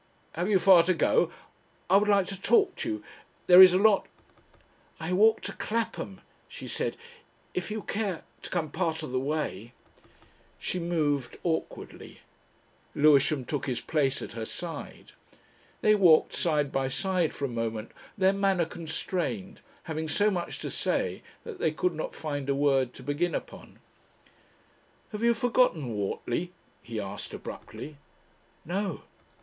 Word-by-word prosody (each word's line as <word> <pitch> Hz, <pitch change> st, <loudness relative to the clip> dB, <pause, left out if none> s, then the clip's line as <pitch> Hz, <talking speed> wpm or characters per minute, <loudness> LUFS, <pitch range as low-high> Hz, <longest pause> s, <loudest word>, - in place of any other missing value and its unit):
Have 175 Hz, +5 st, -2 dB
you 205 Hz, -, +5 dB
far 185 Hz, -2 st, +7 dB
to 185 Hz, 0 st, +2 dB
go? -, -, +2 dB, 0.6 s
I 190 Hz, -, +6 dB
would 210 Hz, +1 st, +2 dB
like 200 Hz, -2 st, +4 dB
to 195 Hz, -1 st, -7 dB
talk 395 Hz, -, +3 dB
to -, -, -3 dB
you. 320 Hz, 0 st, -4 dB, 0.4 s
There 180 Hz, +1 st, +9 dB
is 185 Hz, -1 st, +11 dB
a -, -, +5 dB
lot 205 Hz, 0 st, +4 dB, 0.5 s
..." -, -, -33 dB
"I 170 Hz, +2 st, -3 dB
walk 220 Hz, +4 st, +4 dB
to -, -, -4 dB
Clapham," 215 Hz, -3 st, -3 dB, 0.3 s
she -, -, -9 dB
said. -, -, -2 dB, 0.6 s
"If 180 Hz, -, -3 dB
you 215 Hz, 0 st, -4 dB
care... 200 Hz, -5 st, -3 dB, 0.2 s
to -, -, -8 dB
come 160 Hz, -5 st, -2 dB
part 160 Hz, -2 st, -1 dB
of 155 Hz, -, -6 dB
the 130 Hz, -, 0 dB
way 130 Hz, -6 st, -3 dB, 0.4 s
..." -, -, -31 dB
She 180 Hz, -, -1 dB
moved 150 Hz, -6 st, -1 dB
awkwardly. 165 Hz, -2 st, -4 dB, 0.7 s
Lewisham 145 Hz, -2 st, +4 dB
took 145 Hz, +1 st, -3 dB
his 125 Hz, -2 st, -1 dB
place 140 Hz, -4 st, 0 dB
at -, -, -7 dB
her 115 Hz, 0 st, -5 dB
side. 165 Hz, +8 st, -7 dB, 0.7 s
They 215 Hz, -, +5 dB
walked 180 Hz, -6 st, +5 dB
side 150 Hz, -4 st, +1 dB
by 135 Hz, -1 st, 0 dB
side 180 Hz, +4 st, 0 dB
for 140 Hz, -, -4 dB
a 120 Hz, -3 st, -4 dB
moment, 110 Hz, -1 st, -4 dB, 0.3 s
their 190 Hz, 0 st, +4 dB
manner 195 Hz, -3 st, +2 dB
constrained, 175 Hz, +4 st, -4 dB, 0.2 s
having 160 Hz, -1 st, -4 dB
so 205 Hz, +6 st, +2 dB
much 175 Hz, -3 st, -3 dB
to -, -, -4 dB
say -, -, -1 dB, 0.2 s
that 455 Hz, -5 st, -8 dB
they -, -, +1 dB
could 175 Hz, +3 st, 0 dB
not 155 Hz, -, -5 dB
find 145 Hz, -3 st, -4 dB
a 140 Hz, -, +2 dB
word 135 Hz, -3 st, +2 dB
to 130 Hz, -, -11 dB
begin 145 Hz, +6 st, -1 dB
upon. -, -, -8 dB, 1.3 s
"Have 210 Hz, -1 st, -5 dB
you 235 Hz, 0 st, +4 dB
forgotten 225 Hz, -, +1 dB
Whortley?" 120 Hz, -, -2 dB, 0.3 s
he 115 Hz, -2 st, -5 dB
asked 100 Hz, 0 st, -6 dB
abruptly. 150 Hz, -1 st, -9 dB, 0.7 s
"No." 190 Hz, +1 st, -3 dB
170 Hz, 155 wpm, -28 LUFS, 145-195 Hz, 1.3 s, is